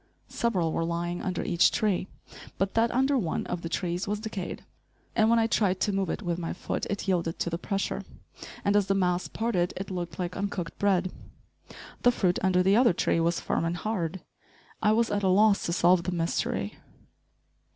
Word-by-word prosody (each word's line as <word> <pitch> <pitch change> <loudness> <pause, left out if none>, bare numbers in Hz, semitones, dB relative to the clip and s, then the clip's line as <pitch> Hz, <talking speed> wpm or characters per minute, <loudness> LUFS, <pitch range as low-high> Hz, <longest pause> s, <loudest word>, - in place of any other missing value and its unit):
Several 185 -9 0
were - - 0
lying 170 +1 -2
under 185 -2 -2
each 170 - +4
tree; 195 -3 0 0.5
but 195 0 0
that 230 +1 +3
under 265 +3 +2
one 170 -8 -2
of 175 - -4
the 165 - -5
trees 175 +2 -2
was 205 +1 -1
decayed, 215 -4 -5 0.5
and 220 -1 +4
when 235 - +5
I 225 - +3
tried 195 -4 +1
to 205 - +2
move 195 -1 0
it - - -3
with 175 -1 -2
my 165 - -3
foot - - -3
it 205 0 -3
yielded 170 -3 0
to 170 - -2
the 170 - -2
pressure, 195 +2 -2 0.6
and 200 - +3
as 205 -2 +3
the 195 - +2
mass 180 -1 +1
parted 195 -6 -1
it 190 +1 -5
looked 175 -2 -4
like 180 -1 -3
uncooked 200 -4 -4
bread. 185 -2 +2 0.9
The 245 - +5
fruit 185 -7 +1
under 180 -1 +3
the 195 +2 +4
other 235 -3 +5
tree 170 - +1
was 170 +1 +1
firm - - -1
and 165 +1 -1
hard. 190 -4 -2 0.6
I 210 - +4
was 230 +1 +2
at 205 0 0
a 195 - +1
loss 200 +2 +4
to - - -1
solve 175 +1 +4
the 180 - -3
mystery. 165 - -2
185 Hz, 200 wpm, -28 LUFS, 175-205 Hz, 0.9 s, when